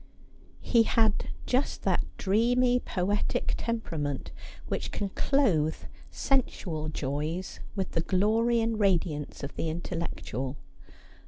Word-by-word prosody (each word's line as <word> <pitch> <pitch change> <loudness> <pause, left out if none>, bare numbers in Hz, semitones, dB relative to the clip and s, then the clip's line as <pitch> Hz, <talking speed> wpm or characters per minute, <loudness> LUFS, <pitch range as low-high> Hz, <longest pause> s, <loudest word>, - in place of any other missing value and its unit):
He 235 - +4
had 220 -1 +2 0.2
just 255 +3 0
that - - +2
dreamy 245 +5 +3
poetic 200 -1 0
temperament 150 - -2 0.4
which - - -2
can 200 - -2
clothe 190 - +2 0.3
sensual 175 - 0
joys 155 +5 -3 0.2
with 190 -2 -2
the 165 - +1
glory 220 +6 +3
and 225 -1 0
radiance 170 -8 +1
of 140 - -4
the 165 - -1
intellectual. 160 -6 -4
190 Hz, 105 wpm, -29 LUFS, 155-230 Hz, 0.4 s, He